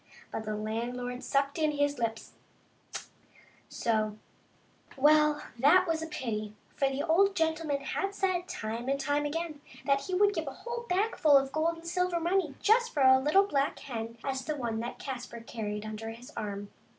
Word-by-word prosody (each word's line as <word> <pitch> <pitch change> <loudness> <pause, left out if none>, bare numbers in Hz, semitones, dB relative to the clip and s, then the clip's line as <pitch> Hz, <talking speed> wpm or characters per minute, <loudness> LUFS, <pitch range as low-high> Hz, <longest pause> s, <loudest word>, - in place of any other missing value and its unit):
But 220 - -4
the 215 0 -2
landlord 245 +4 -3
sucked 275 +3 0
in 310 -1 +2
his 285 -1 +1
lips 225 -1 -3 0.4
— - - -37
" - - -37
tsch - - -6 0.3
" - - -24
— - - -31
so! 215 -2 0 0.8
Well, 300 +1 +5 0.2
that 310 +8 +6
was 325 -1 0
a 320 - -4
pity, 215 -8 -4 0.2
for 275 - +2
the 270 - -3
little 320 +2 0
old 390 +4 +4
gentleman 320 -3 0
had 390 +8 -2
said, 370 -2 0
time 230 +3 -4
and 275 0 +1
time 290 +1 +1
again, 315 -1 -4 0.2
that 275 0 +3
he 370 - -3
would 405 +2 +4
give 325 -5 -3
a 275 - -4
whole 475 0 -4
bagful 360 -6 +4
of 270 0 0
gold 325 +3 +1
and 330 0 -11
silver 360 0 +1
money 345 -1 +1
for - - -26
just 470 +1 +4
such 285 - +3
a 260 0 +8
little 305 +9 +4
black 285 -6 0
hen 230 -3 -6
as 265 -1 -2
the 305 +3 -2
one 235 -5 -2
that 235 +1 -4
Caspar 245 -3 -6
carried 215 -2 -4
under 215 +1 -5
his 230 +2 -10
arm. 205 -1 -4
280 Hz, 200 wpm, -30 LUFS, 235-330 Hz, 0.8 s, a